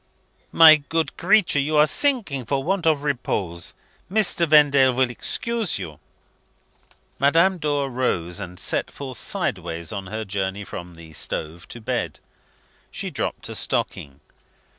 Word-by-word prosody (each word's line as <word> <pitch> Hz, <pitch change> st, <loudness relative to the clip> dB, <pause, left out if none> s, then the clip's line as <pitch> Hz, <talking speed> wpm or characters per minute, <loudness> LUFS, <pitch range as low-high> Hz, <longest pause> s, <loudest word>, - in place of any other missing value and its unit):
"My 160 Hz, -1 st, +9 dB
good 155 Hz, +1 st, -2 dB
creature, 185 Hz, -4 st, +3 dB
you 150 Hz, +2 st, 0 dB
are 150 Hz, -, +7 dB
sinking 200 Hz, -, 0 dB
for 135 Hz, +3 st, -1 dB
want 185 Hz, 0 st, 0 dB
of 150 Hz, -3 st, +2 dB
repose. 100 Hz, -, -2 dB, 0.4 s
Mr. 190 Hz, -5 st, +2 dB
Vendale 140 Hz, -3 st, +6 dB
will 125 Hz, 0 st, +1 dB
excuse 230 Hz, -, -2 dB
you." 75 Hz, -3 st, -8 dB, 1.2 s
Madame 165 Hz, +7 st, +3 dB
Dor 145 Hz, -2 st, 0 dB
rose, 95 Hz, -10 st, -1 dB
and 90 Hz, -2 st, -8 dB
set -, -, 0 dB
forth 130 Hz, -4 st, -7 dB
sideways 85 Hz, +2 st, -2 dB
on 100 Hz, -2 st, -5 dB
her 110 Hz, +3 st, -5 dB
journey 95 Hz, 0 st, -3 dB
from 90 Hz, -3 st, -9 dB
the 80 Hz, -1 st, -13 dB
stove 80 Hz, +3 st, -5 dB
to 120 Hz, -, -8 dB
bed. 110 Hz, -, -3 dB, 0.7 s
She -, -, -5 dB
dropped -, -, -3 dB
a -, -, -6 dB
stocking. 70 Hz, 0 st, -2 dB
135 Hz, 140 wpm, -23 LUFS, 95-155 Hz, 1.2 s, My